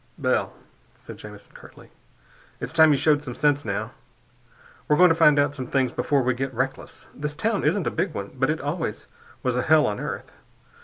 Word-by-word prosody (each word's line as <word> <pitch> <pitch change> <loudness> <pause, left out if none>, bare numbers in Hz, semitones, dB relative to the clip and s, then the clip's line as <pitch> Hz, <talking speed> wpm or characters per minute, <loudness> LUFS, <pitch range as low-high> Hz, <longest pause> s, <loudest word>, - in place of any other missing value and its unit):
"Bell," - - 0 0.4
said - - -11
Jamison 105 -1 -13
curtly, - - -15 0.7
"it's - - -6
time 160 -1 +6
you 145 - +3
showed 145 +1 +2
some 125 -5 -7
sense, 145 -1 +1
now. 110 -2 -3 1.0
We're 150 - +3
going 180 0 +7
to - - +3
find 150 -3 +5
out 145 0 +2
some 130 -3 -6
things 130 -1 0
before 140 -2 0
we 130 +1 +1
get 135 +2 -3
reckless. 130 +2 -4
This 150 0 -5
town 220 +4 -1
isn't 200 -6 +1
a - - 0
big 190 - -1
one, 100 0 -5
but 130 +1 0
it 155 +1 0
always 145 - -4 0.4
was 125 -1 0
a 125 - +1
hell 155 +3 +4
on 105 - -2
earth. - - -6
145 Hz, 200 wpm, -24 LUFS, 130-155 Hz, 1.0 s, going